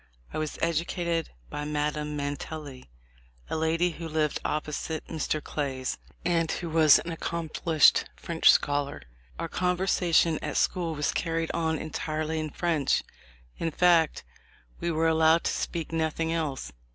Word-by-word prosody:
I - - -2
was 155 -1 -3
educated 170 0 0 0.2
by 145 - -3
Madame 150 0 -2
Mantelli, 145 - -5 0.6
a - - 0
lady 165 +2 +1
who 165 0 -7
lived 155 -2 0
opposite 155 +1 -3
Mr. 155 -1 -2
Clay's, 135 -3 -3 0.3
and 165 -2 +2
who 170 -3 -4
was 155 -2 +7
an 170 -1 -4
accom 165 -1 -4
plished 160 -3 +4
French 165 -1 +2
scholar. 145 - +2 0.3
Our 165 - -3
conversation 180 -2 +2
at - - -3
school 170 -3 +1
was 150 0 0
carried 165 -1 -1
on 160 -1 0
entirely 155 0 -3
in 155 0 -3
French 160 -2 +1 0.3
— - - -29
in 165 - 0
fact 170 -1 +3 0.6
we 170 - -1
were 165 0 +2
allowed 160 +1 +4
to - - +1
speak 165 -2 -3
nothing 160 0 0
else. 145 - -2
160 Hz, 145 wpm, -28 LUFS, 150-165 Hz, 0.6 s, was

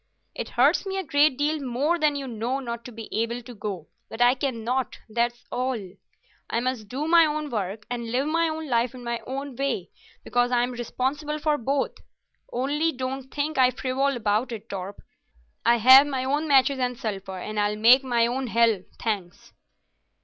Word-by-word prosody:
It - - -5
hurts - - +4
me 385 0 -2
a 385 - -1
great 285 -3 +3
deal 300 +2 0
more 280 +6 0
than 300 -2 +2
you 275 -1 -4
know 240 +3 -2
not 235 -3 -5
to 245 - -8
be 225 -1 -8
able 235 +2 -1
to 245 +1 -10
go, 200 -6 -6 0.2
but 225 - -8
I 245 +1 +6
cannot, 255 -1 -2
that's 235 +2 -1
all. 255 0 -1 0.7
I 230 - 0
must 245 -3 -2
do 275 +8 -3
my 335 -1 +6
own 300 -1 -3
work 205 -1 -3
and 235 -2 -4
live 260 +3 +1
my 330 +1 +2
own 315 0 -5
life 240 -1 +1
in 250 - -10
my 235 0 -2
own 275 0 -5
way, 265 -9 -2 0.3
because 245 0 +1
I'm 245 0 +2
responsible 265 +5 -2
for 305 0 +1
both. 270 +3 -1 0.6
Only 290 +6 0
don't 265 0 -5
think 295 0 -2
I 255 -1 +6
frivol 260 +2 -1
about 220 +2 0
it, 225 -1 -7
Torp. 195 0 -6 0.6
I 235 +1 +5
have 260 +5 +8
my 265 -3 -2
own 290 +4 0
matches 275 -1 +4
and 250 -1 -1
sulphur, 195 -4 -5
and 210 +3 -4
I'll 205 0 +1
make 240 +5 +6
my 240 -3 +2
own 255 +2 -2
hell, 230 -3 +3 0.2
thanks." 200 -6 -4
250 Hz, 185 wpm, -25 LUFS, 230-275 Hz, 0.7 s, have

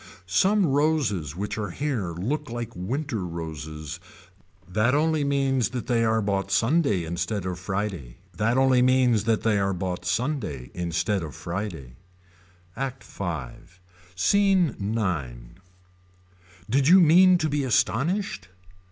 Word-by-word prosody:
Some 190 - +3
roses 135 - 0
which 105 +3 -4
are 105 -2 -3
here 120 -4 -2
look 130 - -3
like 120 -1 -5
winter 115 - -3
roses. 80 -3 -6 0.7
That 110 +8 +1
only 155 0 +2
means 135 -3 +1
that 125 -2 -5
they 115 -2 +1
are 110 -1 +2
bought 100 -1 -1
Sunday 115 - +2
instead 85 +4 -3
of 90 -1 -4
Friday 90 -10 -4 0.2
that 115 +4 +1
only 130 -1 +4
means 125 -4 +3
that 115 -1 +1
they 105 -3 +2
are 100 0 0
bought 90 0 -3
Sunday 95 - -2
instead 90 +3 -1
of 75 -4 -7
Friday. 85 - -6 0.8
ACT 135 -1 -4
V. 100 - -7 0.9
SCENE 185 - +3 0.2
IX. 70 - -4 1.1
Did 135 +1 +2
you 185 +4 +8
mean 180 +2 +6
to 155 - 0
be 145 -1 -1
astonished. 130 - 0
110 Hz, 130 wpm, -25 LUFS, 90-140 Hz, 1.1 s, you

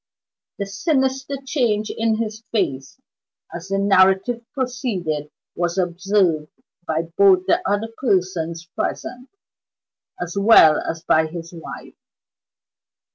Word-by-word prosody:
The 200 - -3
sinister 265 +6 -1
change 230 -6 0
in 225 0 +1
his 220 -1 -4
face, 135 - -2 0.5
as 170 +2 -7
the 195 0 -1
narrative 195 +4 +3
proceeded 215 - -3 0.3
was 175 +1 -1
observed 175 -3 +1 0.4
by 160 +1 0
both 190 -2 +5
the 190 - +2
other 205 +3 0
persons 175 -7 -1
present, 250 +8 -5 0.9
as 175 0 -5
well 200 -7 +6
as 165 0 -5
by 160 -1 +3
his 170 +1 -8
wife. 165 -2 -9
195 Hz, 110 wpm, -21 LUFS, 170-225 Hz, 0.9 s, well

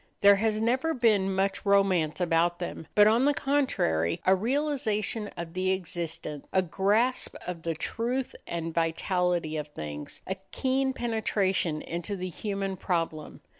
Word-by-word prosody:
There 200 0 +7
has 215 +1 +1
never 260 +8 +1
been 215 -6 +3
much 195 +1 0
romance 195 -6 +3
about 175 0 +2
them, 175 -3 -6
but, 210 - +8
on 230 +5 +4
the 290 0 +3
contrary, 85 - +1
a 190 - +6
realization 225 -2 0
of 170 -1 -6
the 185 +1 0
existent, 165 -5 -4
a 190 - +3
grasp 210 +8 +1
of 175 -2 -5
the 165 0 -2
truth 240 +10 -2
and 165 -1 -3
vitality 170 0 0
of 150 -1 -4
things, 75 - -7
a 190 - -3
keen 265 0 +1
penetration 200 -9 0
into 175 +4 -4
the 185 -1 -4
human 195 +1 -3
problem. 165 -4 -2
190 Hz, 145 wpm, -28 LUFS, 165-225 Hz, -, but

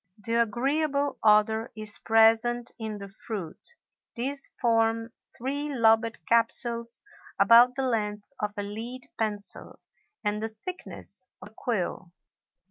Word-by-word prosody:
The 220 +2 -3
agreeable 280 +5 0
odor 220 +1 +4
is 215 -1 -2
present 225 +2 +3
in 220 -2 -4
the 200 -1 -8
fruit. 200 - -7 0.4
These 275 +4 -2
form 225 -1 +1 0.2
three 285 +4 -3
lobed 230 -3 +2
capsules 235 0 +2 0.4
about 235 +5 +7
the 270 0 -1
length 210 -1 -2
of 210 -2 -1
a 205 - -2
lead 230 +5 -7
pencil 210 -2 -2 0.4
and 210 0 0
the 220 - -2
thickness 215 - -8
of 185 - -11
a - - -27
quill. 185 -6 -3
225 Hz, 125 wpm, -27 LUFS, 210-240 Hz, 0.4 s, about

